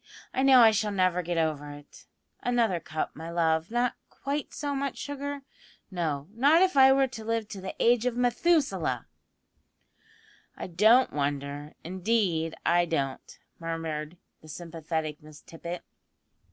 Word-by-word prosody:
I 260 - 0
know 265 -2 +7
I 225 -1 +8
shall 215 0 0
never 185 -3 +1
get 175 0 -3
over 155 -3 -1
it 145 0 -13 0.3
another 235 -7 +1
cup, 155 -1 -4
my 160 +2 -7
love; 165 -1 +1
not 240 +1 +1 0.2
quite 280 +1 -4
so 285 -1 -3
much 275 0 -3
sugar 285 0 -5 0.5
no, 155 -6 -2
not 290 +9 +5
if 375 -4 +1
I 265 -1 +8
were 270 0 +4
to 225 -3 -8
live 225 -1 -1
to 195 -3 -7
the 190 - -6
age 240 +1 +3
of 245 - -1
Methusaleh." 275 +5 +1 1.5
"I - - -5
don't 215 +8 +4
wonder, 145 +1 -3
indeed 180 -3 0
I 175 0 +4
don't," 140 -5 -3 0.2
murmured 165 -1 -4 0.2
the 155 - -15
sympathetic 160 -1 -5
Miss 150 -1 -14
Tippet. 170 +1 -8
180 Hz, 145 wpm, -28 LUFS, 160-245 Hz, 1.5 s, I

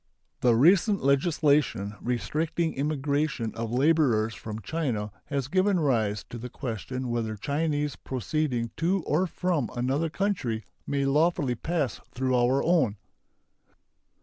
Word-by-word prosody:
The 120 -2 +4
recent 185 - +4
legislation 140 - +2
restricting 155 +7 -1
immigration 140 -4 -1
of 115 0 -4
laborers 125 -5 +3
from 105 +2 -6
China 120 -11 -2
has 140 -3 -2
given 185 +3 +2
rise 110 -8 +1
to 120 - -6
the 125 +2 -6
question 125 +1 -4
whether 115 -2 -1
Chinese 145 +3 -1
proceeding 130 -2 -2
to 180 +3 +1
or 170 +6 +1
from 170 -7 -1
another 135 +7 0
country 155 - -1 0.2
may 140 -1 0
lawfully 150 -1 +2
pass 145 0 -2
through 130 +1 +1
our 125 +2 +3
own. 160 - +3
140 Hz, 120 wpm, -27 LUFS, 120-160 Hz, 0.2 s, The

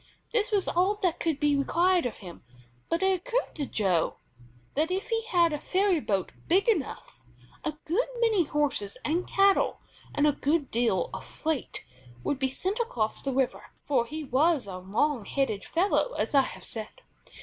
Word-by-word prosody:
This 445 -2 +2
was 405 -3 +1
all 370 +4 +2
that 350 -2 +1
could 320 -4 0
be 295 -1 +3
required 345 +3 +2
of 240 - -7
him, 175 - -10 0.5
but 335 +3 0
it 380 -1 +3
occurred - - -1
to 290 -4 -3
Joe 185 -6 +1 0.6
that 310 +4 +1
if 375 +2 -2
he 455 -1 0
had 345 -7 +3
a 300 - -2
ferry 375 0 +2
boat 195 -9 -1 0.2
big 380 +7 +3
enough, 340 - -1 0.4
a 310 - -1
good 380 +10 +1
many 440 -7 +3
horses 280 -9 -1
and 340 +4 0
cattle 390 0 +3 0.4
and 290 - +3
a 300 - +5
good 290 +1 0
deal 225 -7 +1
of - - -5
freight 315 -4 -3 0.4
would 280 - -1
be 265 -1 +1
sent 380 - -2
across 230 - -1
the 275 - -2
river, 260 -1 0 0.2
for 250 -5 +1
he 310 +3 -5
was 290 +1 +2
a 185 -2 -6
"long 220 +7 0
headed" 220 -7 -1
fellow 400 +8 +1
as - - -2
I 275 - +7
have - - -6
said. 225 - -7
305 Hz, 180 wpm, -28 LUFS, 260-375 Hz, 0.6 s, I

